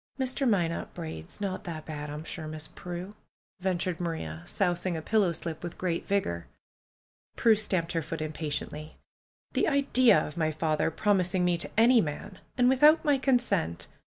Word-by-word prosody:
^^Mr. 260 0 +1
Minot 170 -6 0
Braid's 160 - -7
not 195 -2 -3
that 160 -3 -6
bad, 150 -1 -6
I'm 150 +1 -6
sure. 160 -1 -6
Miss 155 0 -5
Prue," 180 +3 -7 0.5
ventured 180 -1 -1
Maria, 80 - -4
sousing 175 -2 0
a - - -2
pillow 210 -4 +2
slip 160 -1 -5
with 175 -1 -6
great 175 -2 -2
vigor. 85 - -1 0.9
Prue 230 - +5
stamped 185 -5 0
her 165 -1 0
foot 160 +1 -5
impatiently. 155 0 -5 0.6
^^The - - +2
idea 265 -6 +4
of 150 - -2
my 160 -2 +1
father 155 0 0
promising 185 -1 +1
me 175 -1 +3
to 170 - -1
any 235 +1 +6
man! 160 +4 -5 0.2
And 245 -1 +4
without 295 +6 +5
my 285 -2 +3
consent 245 - +1
175 Hz, 160 wpm, -29 LUFS, 155-210 Hz, 0.9 s, any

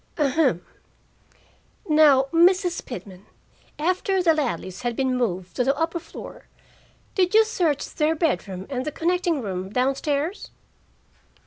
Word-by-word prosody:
"Ahem. 275 - +1 1.2
Now, 300 -4 +6
Mrs. 355 +1 +3
Pitman, 195 -6 -9 0.5
after 370 +3 0
the 330 -2 +5
Ladleys 245 - -3
had 240 -1 -2
been 260 0 0
moved 185 -7 -2
to 250 - +2
the 275 +2 +1
upper 330 +2 -1
floor, 330 - -11 0.7
did 370 +1 +1
you 440 0 +7
search 340 - 0
their 310 +1 0
bedroom 190 - -2
and 255 -1 -2
the 305 - -3
connecting 340 -3 0
room 190 -2 -4
down 255 +5 +1
stairs?" 295 +6 -3
295 Hz, 130 wpm, -24 LUFS, 245-340 Hz, 1.2 s, you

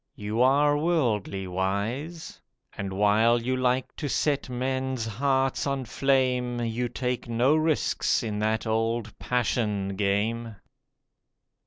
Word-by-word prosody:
You 110 -1 -2
are 145 +3 +4
worldly 115 - 0
wise, 100 - -3 0.3
And 100 -1 -4
while 105 +4 +3
you 130 +2 -1
like 125 0 0
to 145 - -3
set 140 -1 0
men's 130 -1 -2
hearts 135 +5 0
on 135 -2 -2
flame, 125 -1 +1
You 120 +1 -2
take 125 -1 -3
no 120 +6 +3
risks 155 -4 +1
in 105 -2 -3
that 110 +2 0
old 115 0 -1
passion 105 -5 0
game. 105 +3 -1
120 Hz, 120 wpm, -26 LUFS, 110-130 Hz, 0.3 s, are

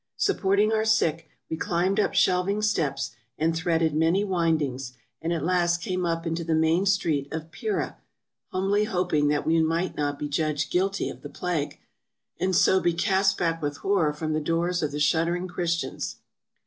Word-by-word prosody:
Supporting 210 - +2
our 220 0 +2
sick, 165 -7 +1 0.2
we - - -3
climbed 180 +5 0
up - - +1
shelving 190 +3 +2
steps, 150 - 0 0.3
and 165 +1 +1
threaded 165 -1 +1
many 165 +6 +2
windings, 155 -9 0 0.3
and 165 - -2
at 170 - -1
last 175 -1 +2
came 180 -1 -1
up 165 0 -2
into 165 0 -2
the 160 -1 0
main 160 +4 +2
street 160 -7 +1
of 160 0 -5
Pera, 430 - -3 0.5
humbly 195 +3 +1
hoping 180 -7 +1
that 145 0 +1
we 165 +1 +3
might 165 +3 0
not 145 -1 -1
be 150 - -3
judged 150 0 -1
guilty 195 +2 0
of - - -8
the - - -8
plague, 170 -5 -3 0.6
and 185 0 +1
so 190 - +5
be 175 -2 +1
cast 195 +2 +2
back 165 -1 0
with 145 -1 -2
horror 190 -6 +1
from 155 +1 -3
the 155 - 0
doors 170 +3 0
of 150 -2 -1
the 145 - -4
shuddering 170 +4 +1
Christians. 170 -1 -2
170 Hz, 175 wpm, -26 LUFS, 155-185 Hz, 0.6 s, so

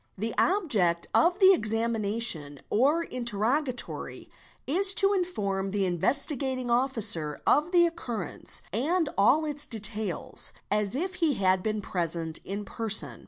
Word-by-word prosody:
The 225 +4 -4
object 215 - +1
of 350 +2 +2
the 385 -1 +6
examination 215 - -1
or 285 +9 +1
interrogatory 245 +2 -3 0.3
is 385 +7 +3
to 395 0 +4
inform 200 - -3
the 200 0 -2
Investigating 255 - 0
Officer 225 - -1
of 305 +4 +1
the 350 -1 +4
occurrence 245 - +2
and 310 - -1
all 265 +11 +2
its 295 -1 +1
details, 215 -4 0 0.2
as 210 +1 +2
if 370 +6 -4
he 310 -5 +1
had 190 -2 +1
been 215 +1 -3
present 165 -3 -4
in 205 +2 -6
person. 200 - 0
230 Hz, 125 wpm, -26 LUFS, 195-300 Hz, 0.3 s, the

